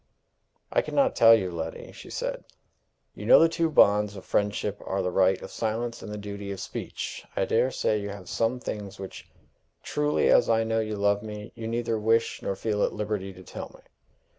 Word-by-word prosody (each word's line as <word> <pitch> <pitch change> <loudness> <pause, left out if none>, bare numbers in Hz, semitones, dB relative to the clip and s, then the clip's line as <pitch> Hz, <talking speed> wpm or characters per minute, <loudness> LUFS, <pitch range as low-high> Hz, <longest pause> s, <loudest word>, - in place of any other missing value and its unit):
"I - - +4
can - - -7
not 275 -2 +3
tell 115 0 +8
you, 95 -5 -1
Letty," 80 -1 -6
she - - -12
said. - - -3 0.7
"You 105 - -8
know - - +9
the 165 - +6
two 165 0 0
bonds 105 -7 +4
of 95 - -10
friendship 105 0 -1
are 95 0 -2
the 90 - -1
right 95 0 +3
of - - -8
silence 115 +1 -2
and 105 - -7
the 105 - -5
duty 100 -1 -6
of 100 - -5
speech. - - -5
I 95 - +1
dare 120 +6 +2
say 105 -4 0
you 100 - -4
have 100 -2 -8
some 115 +2 0
things 105 -5 -6
which, 95 -1 -9 0.5
truly 150 0 +1
as 120 - +5
I 115 0 +3
know 115 0 0
you 110 -1 -2
love 100 0 +2
me, 105 0 -8
you 115 -1 -6
neither 115 -1 -1
wish 115 +2 +1
nor 100 - -2
feel 105 +1 -1
at - - 0
liberty 105 -2 -3
to 95 0 -13
tell - - -8
me." - - -19
105 Hz, 210 wpm, -27 LUFS, 100-115 Hz, 0.7 s, know